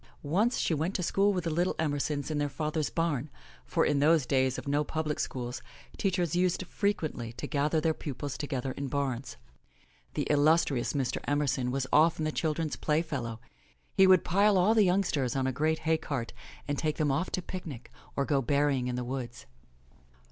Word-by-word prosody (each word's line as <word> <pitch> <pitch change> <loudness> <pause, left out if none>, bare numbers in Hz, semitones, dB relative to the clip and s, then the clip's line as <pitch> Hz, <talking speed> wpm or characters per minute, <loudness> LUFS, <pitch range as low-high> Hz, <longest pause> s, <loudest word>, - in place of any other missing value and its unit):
Once 200 - +1
she - - +1
went 160 +6 -1
to 180 - 0
school 200 +4 +3
with 180 -3 -1
the 165 - -1
little 175 +4 +1
Emersons 145 -1 -1
in 150 - -1
their 145 0 0
father's 155 +1 -2
barn, 155 -4 -1 0.4
for - - +1
in 145 - +2
those 155 -1 +4
days 130 0 +1
of - - -7
no 145 +1 +2
public 155 0 -2
schools, 125 -1 -3 0.3
teachers 180 -4 0
used 180 +1 +1
frequently 160 - -2
to 120 - -6
gather 150 +2 +1
their 160 +1 +1
pupils 145 -2 -5
together 135 -3 -3
in 140 +1 -4
bams. 130 -4 -2 0.8
The - - 0
illustrious 145 -3 +3
Mr. 135 -4 -1
Emerson 140 -3 0
was 135 +1 -1
often 155 +1 +4
the 155 - 0
children's 155 -1 -1
playfellow. 140 -8 -1 0.5
He 190 - +6
would 185 -2 +6
pile 200 +2 +4
all 185 +5 +4
the 215 -3 +5
youngsters 180 -9 +1
on 135 -1 0
a 130 - +1
great 155 +5 +1
hay 160 0 +3
cart 130 -5 -4 0.3
and 145 -1 -1
take 155 -1 -1
them 150 -2 +1
off 140 +7 0
to 185 - 0
picnic 160 -11 -7 0.2
or 140 - +1
go 140 -1 +2
berrying 140 -1 +1
in 125 - -2
the 125 - -2
woods. 125 -1 -5
150 Hz, 185 wpm, -29 LUFS, 135-165 Hz, 0.8 s, He